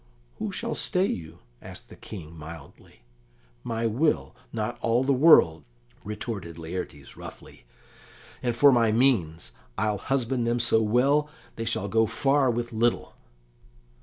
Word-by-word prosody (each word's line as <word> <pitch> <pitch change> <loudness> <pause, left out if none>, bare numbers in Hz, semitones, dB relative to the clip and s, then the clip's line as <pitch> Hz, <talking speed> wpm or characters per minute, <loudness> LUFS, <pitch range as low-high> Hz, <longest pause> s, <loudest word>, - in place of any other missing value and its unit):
"Who - - -3
shall - - -3
stay 185 +1 +1
you?" 80 - -5 0.2
asked - - -10
the - - -12
King 85 -6 -10
mildly. 75 -5 -12 0.6
"My 115 0 -2
will, 130 +5 0 0.2
not 115 +1 -3
all 115 +2 +2
the 140 +1 +2
world!" 130 - +6 0.4
retorted 100 -5 -6
Laertes 80 -4 -7
roughly. - - -12 0.8
"And 120 -2 -1
for 140 +3 +7
my 115 -3 +3
means, 90 - +1 0.3
I'll 105 -1 0
husband 130 -2 -1
them 120 +1 +1
so 115 -1 +3
well, 135 +7 +2 0.3
they 115 - -4
shall 110 -3 -2
go 110 +2 +2
far 135 +3 +2
with 120 0 -2
little." 115 +2 0
115 Hz, 135 wpm, -26 LUFS, 95-125 Hz, 0.8 s, for